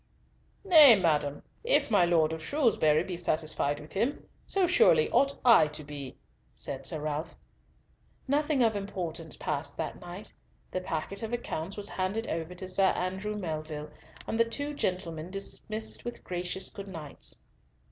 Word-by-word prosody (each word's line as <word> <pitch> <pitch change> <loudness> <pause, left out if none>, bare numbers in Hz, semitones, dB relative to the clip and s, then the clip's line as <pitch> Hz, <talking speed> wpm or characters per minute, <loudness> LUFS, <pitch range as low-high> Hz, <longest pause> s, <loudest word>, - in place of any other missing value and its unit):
"Nay, 305 - +9
madam, 150 -5 +1 0.2
if 475 - +3
my 200 -5 +5
Lord 160 -2 +3
of 160 -1 -6
Shrewsbury 175 - +3
be 180 -1 -5
satisfied 155 -3 -1
with 150 +1 -12
him, 235 +9 -1 0.2
so 390 -2 +2
surely 450 +5 +4
ought 275 0 +3
I 230 -11 +7
to 150 0 -7
be," 140 -2 -8 0.4
said 135 -1 -4
Sir 155 -3 -2
Ralf. 155 +1 -3 0.9
Nothing 295 +2 +1
more 230 - +6
of 220 - -8
importance 175 -5 -4
passed 140 0 -3
that - - -4
night. 180 +4 -9 0.4
The 185 - -2
packet 185 +3 -3
of 225 +1 -4
accounts 195 -6 -4
was 205 -1 0
handed 195 +5 -2
over 165 +2 -3
to 185 +1 -6
Sir 190 +1 +3
Andrew 190 +4 -2
Melville, 155 -5 -5 0.3
and 225 - -2
the - - +7
two 285 +6 -3
gentlemen 175 - -3
dismissed 215 +3 -3
with 240 0 -6
gracious 180 +1 -3
good 200 -1 -9
nights. 160 -6 -6
185 Hz, 155 wpm, -29 LUFS, 155-225 Hz, 0.9 s, Nay